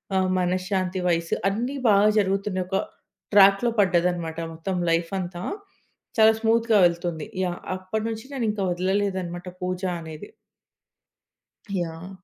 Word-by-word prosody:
ఆహ్, 185 0 +2
మనశ్శాంతి, 185 +1 -1
వయసు 170 -1 0
అన్ని 240 +7 -2
బాగా 205 +1 +5
జరుగుతున్నాయి. 195 -1 0
ఒక 195 0 +1 0.6
ట్రాక్‍లో 200 +4 +6
పడ్డదనమాట 175 -3 +1
మొత్తం 165 +4 -4 0.2
లైఫ్ 165 0 0
అంతా. 175 -1 -5 0.8
చాలా 220 0 +7
స్మూత్‍గా 225 -1 +3
వెళ్తుంది. 170 -1 -4 0.2
యాహ్! 175 -1 -3 0.2
అప్పటినుంచి 220 +5 -4
నేనింక 220 -6 -1
వదలలేదన్నమాట 185 -1 -1
పూజ 180 0 -2 0.2
అనేది. 160 - -9 1.5
యాహ్! 165 +2 -5
185 Hz, 110 wpm, -25 LUFS, 175-205 Hz, 1.5 s, చాలా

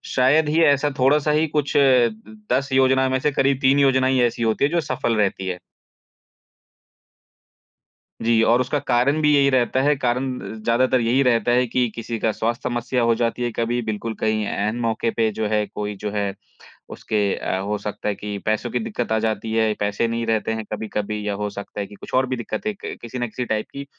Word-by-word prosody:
शायद 145 +4 +4
ही 160 +2 +2
ऐसा 145 -1 +3
थोड़ा-सा 145 +3 +3
ही 155 +2 +2
कुछ 150 -1 -1
10 120 -1 +1
योजना 130 0 +4
में 130 0 0
से 150 - +1
करीब 135 -1 +1
3 135 +1 +4
योजनाएँ 130 -1 +3
ही 130 - +3
ऐसी 120 0 0
होती 110 +4 +2
हैं 145 - -1
जो 170 0 +1
सफल 120 -5 -1
रहती 95 -2 0
हैं। 90 -1 -3 2.6
जी, 115 0 +3
और 115 +2 +4
उसका 130 +4 0
कारण 135 +2 +1
भी 150 0 +4
यही 140 -1 +4
रहता 130 0 +2
है। 145 +2 +3
कारण 125 0 0 0.2
अ, - - -7
ज़्यादातर 120 +3 +1
यही 120 +4 +2
रहता 120 -3 +2
है 125 +1 +3
कि 125 +1 0
किसी 115 0 -5
का 110 - 0
स्वास्थ्य 115 +3 -2
समस्या 120 +1 -1
हो 115 0 +3
जाती 115 +1 -1
है। 120 - 0
कभी 120 +1 0
बिल्कुल 110 0 -4
कहीं 110 -1 0
ऐन 105 +3 -2
मौके 115 0 0
पे 115 -1 0
जो 110 - 0
है 105 0 +1
कोई 105 0 -5
जो 105 +2 -4
है 100 -2 -2 0.6
उसके 110 - -2
अ, 95 - -2
हो 100 +2 -2
सकता 105 +1 -5
है 105 - 0
कि 105 0 -6
पैसों 110 +3 0
की - - 0
दिक़्क़त 210 - -3
आ 110 - +2
जाती 110 0 -2
है, 110 -1 +2
पैसे 105 +3 0
नहीं 115 0 -2
रहते 110 0 0
हैं 110 0 -4
कभी-कभी। 105 -1 -3
या 100 - -1
हो 105 - -2
सकता 100 +1 -7
है 100 - -3
कि 105 - -14
कुछ - - -11
और 130 +1 +3
भी 130 0 -2
दिक़्क़तें 165 - -4
कि 200 - -7
किसी 120 +2 -6
न 120 - -1
किसी 125 +2 -4
टाइप 110 -2 -2
की 140 0 -6
120 Hz, 215 wpm, -22 LUFS, 110-130 Hz, 2.6 s, शायद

